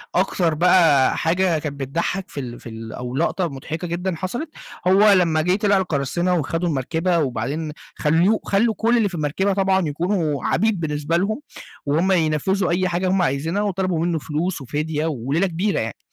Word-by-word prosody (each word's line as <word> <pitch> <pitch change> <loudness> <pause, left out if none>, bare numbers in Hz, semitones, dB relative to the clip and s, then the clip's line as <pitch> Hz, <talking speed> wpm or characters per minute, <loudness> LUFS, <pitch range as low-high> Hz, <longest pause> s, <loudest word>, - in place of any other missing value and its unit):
أكتر 180 -3 +1
بقى 165 -5 +4
حاجة 170 -1 +1
كانت 145 -2 -5
بتضحّك 170 +8 -2
في 140 - -6
ال 120 -2 -6
في 115 - -10
ال 110 0 -8
أو 125 +1 -5
لقطة 170 +3 0
مضحكة 160 +5 -6
جدًا 175 +1 -2
حصلت، 240 - -4 0.4
هو 200 +3 +6
لمّا 165 -5 +3
جِه 180 +3 +2
طِلع 205 -1 +2
القراصنة 175 +1 0
وخدوا 165 +4 -1
المركبة، 165 +5 0
وبعدين 145 +4 -2 0.2
خلّوه 170 +8 +2
خلّوا 220 +3 +2
كل 235 +2 +2
اللي 210 -4 +2
في 180 - -7
المركبة 165 +6 0
طبعًا 190 -3 +2
يكونوا 160 -2 -1
عبيد 220 -4 +1
بالنسبة 150 +1 -1
لهم 215 +9 -1 0.4
وهُم 165 +7 +1
ينفذوا 175 +3 +1
أي 185 +1 +1
حاجة 180 +2 -1
هُم 190 -1 +2
عايزينها، 165 +6 0
وطلبوا 185 -4 -1
منُّه 170 -2 0
فلوس 160 +2 -3
وفِدية 150 +3 -2
وليلة 150 +5 0
كبيرة 185 +4 -1
يعني. 110 -2 -4
170 Hz, 170 wpm, -21 LUFS, 150-190 Hz, 0.4 s, هو